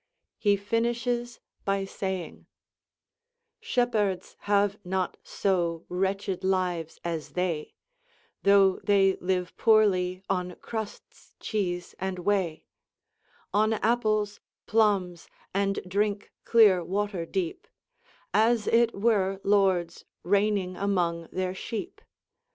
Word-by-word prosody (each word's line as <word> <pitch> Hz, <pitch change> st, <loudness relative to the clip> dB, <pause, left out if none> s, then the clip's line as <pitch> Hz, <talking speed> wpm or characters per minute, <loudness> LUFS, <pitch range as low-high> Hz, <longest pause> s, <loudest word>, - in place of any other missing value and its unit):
He 205 Hz, -1 st, +3 dB
finishes 235 Hz, +3 st, -1 dB, 0.2 s
by 195 Hz, 0 st, 0 dB
saying: 190 Hz, -2 st, -5 dB, 1.1 s
"Shepherds 210 Hz, -7 st, 0 dB
have 205 Hz, 0 st, +1 dB
not 185 Hz, 0 st, -2 dB
so 170 Hz, -4 st, -1 dB
wretched 190 Hz, +1 st, -1 dB
lives 180 Hz, -4 st, -1 dB
as 165 Hz, -2 st, -4 dB
they: 175 Hz, -4 st, -2 dB, 0.7 s
Though 200 Hz, -1 st, +5 dB
they 195 Hz, -2 st, +3 dB
live 180 Hz, 0 st, -2 dB
poorely 190 Hz, -5 st, +3 dB
on 180 Hz, -2 st, -2 dB
cruddes, 220 Hz, -2 st, -8 dB
chese, 180 Hz, -5 st, -2 dB
and 190 Hz, 0 st, -3 dB
whey, 180 Hz, -3 st, -1 dB, 0.9 s
On 215 Hz, +2 st, +3 dB
apples, 215 Hz, -2 st, +1 dB, 0.3 s
plummes, 200 Hz, -6 st, +1 dB, 0.3 s
and 195 Hz, 0 st, +1 dB
drinke 205 Hz, +2 st, -1 dB
cleree 205 Hz, -6 st, +5 dB
water 200 Hz, -2 st, -1 dB
deepe, 185 Hz, -3 st, -3 dB, 0.7 s
As 225 Hz, 0 st, +3 dB
it 230 Hz, 0 st, +3 dB
were 195 Hz, -3 st, +1 dB
lordes 190 Hz, -4 st, +2 dB, 0.2 s
reigning 200 Hz, -1 st, +1 dB
among 175 Hz, -4 st, 0 dB
their 185 Hz, 0 st, -2 dB
sheepe. 225 Hz, -, -6 dB
195 Hz, 100 wpm, -27 LUFS, 180-210 Hz, 1.1 s, Though